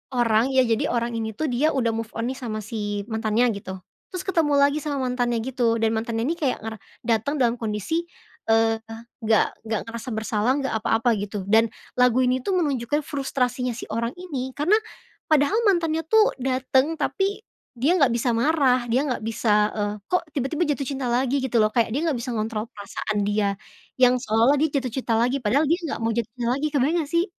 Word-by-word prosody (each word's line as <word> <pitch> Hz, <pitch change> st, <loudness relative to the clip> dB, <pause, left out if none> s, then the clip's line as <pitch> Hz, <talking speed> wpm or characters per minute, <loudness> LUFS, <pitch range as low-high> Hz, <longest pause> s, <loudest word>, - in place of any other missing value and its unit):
orang, 230 Hz, -1 st, +3 dB
ya 260 Hz, -, +5 dB
jadi 230 Hz, -2 st, +1 dB
orang 235 Hz, 0 st, 0 dB
ini 220 Hz, -1 st, -3 dB
tuh 310 Hz, +6 st, -1 dB
dia 295 Hz, +6 st, +2 dB
udah 235 Hz, -4 st, +1 dB
move 225 Hz, 0 st, -3 dB
on 230 Hz, +2 st, -2 dB
nih 265 Hz, -, -7 dB
sama 220 Hz, -4 st, -4 dB
si 205 Hz, -1 st, -3 dB
mantannya 220 Hz, +2 st, +2 dB
gitu, 190 Hz, -1 st, -7 dB, 0.4 s
terus 365 Hz, 0 st, -4 dB
ketemu 330 Hz, -6 st, +1 dB
lagi 280 Hz, +1 st, +3 dB
sama 290 Hz, -2 st, -3 dB
mantannya 245 Hz, -2 st, 0 dB
gitu, 240 Hz, -2 st, +1 dB
dan 225 Hz, -, +2 dB
mantannya 225 Hz, 0 st, -2 dB
ini 330 Hz, +7 st, -1 dB
kayak 275 Hz, -5 st, -1 dB
ngara 220 Hz, 0 st, -5 dB, 0.3 s
dateng 230 Hz, +5 st, 0 dB
dalam 240 Hz, -1 st, +2 dB
kondisi, 220 Hz, -, -2 dB, 0.4 s
eee, 225 Hz, 0 st, +3 dB, 0.5 s
nggak 220 Hz, -1 st, +4 dB, 0.2 s
nggak 220 Hz, -1 st, 0 dB
ngerasa 235 Hz, +2 st, -6 dB
bersalah, 220 Hz, +2 st, 0 dB
nggak 270 Hz, -, -2 dB
apa-apa 225 Hz, +1 st, +1 dB
gitu. 205 Hz, 0 st, -4 dB
Dan 225 Hz, +2 st, +5 dB, 0.3 s
lagu 250 Hz, 0 st, +4 dB
ini 255 Hz, +1 st, +2 dB
tuh 385 Hz, -, +1 dB
menunjukkan 290 Hz, -4 st, 0 dB
frustrasinya 255 Hz, -3 st, -1 dB
si 245 Hz, -, -7 dB
orang 230 Hz, +3 st, -2 dB
ini, 275 Hz, -8 st, -5 dB
karena 340 Hz, +9 st, +3 dB, 0.5 s
padahal 310 Hz, +5 st, +3 dB
mantannya 325 Hz, -4 st, +1 dB
tuh 440 Hz, +3 st, +5 dB
dateng, 260 Hz, +3 st, +1 dB
tapi 395 Hz, +2 st, -1 dB, 0.3 s
dia 260 Hz, +7 st, +2 dB
nggak 270 Hz, -5 st, +4 dB
bisa 240 Hz, +1 st, +1 dB
marah, 255 Hz, -1 st, +2 dB
dia 250 Hz, +4 st, +2 dB
nggak 250 Hz, -, -1 dB
bisa, 225 Hz, 0 st, 0 dB, 0.2 s
eee, 205 Hz, -1 st, -1 dB
kok 360 Hz, -, +1 dB
tiba-tiba 285 Hz, +5 st, -1 dB
jatuh 280 Hz, -2 st, -1 dB
cinta 270 Hz, -2 st, -3 dB
lagi 260 Hz, +3 st, +1 dB
gitu 250 Hz, -2 st, 0 dB
loh, 215 Hz, -, +4 dB
kayak 235 Hz, -2 st, +3 dB
dia 275 Hz, +6 st, -1 dB
nggak 305 Hz, -, +1 dB
bisa 245 Hz, +1 st, -4 dB
ngontrol 215 Hz, 0 st, -2 dB
perasaan 205 Hz, 0 st, -3 dB
dia, 205 Hz, -1 st, 0 dB, 0.4 s
yang 250 Hz, 0 st, +6 dB
seolah-olah 230 Hz, +4 st, +3 dB
dia 315 Hz, -, +2 dB
jatuh 255 Hz, -2 st, -5 dB
cinta 250 Hz, -3 st, -1 dB
lagi, 250 Hz, +4 st, +2 dB
padahal 270 Hz, +9 st, +3 dB
dia 335 Hz, +4 st, +2 dB
nggak -, -, -3 dB
mau 225 Hz, 0 st, 0 dB
jatuh 235 Hz, -2 st, -1 dB
cinta 235 Hz, -, -1 dB
lagi, 290 Hz, +3 st, -1 dB
kebayang 290 Hz, +4 st, +2 dB
nggak 290 Hz, -, -11 dB
sih? 340 Hz, +1 st, +2 dB
245 Hz, 195 wpm, -24 LUFS, 225-280 Hz, 0.5 s, yang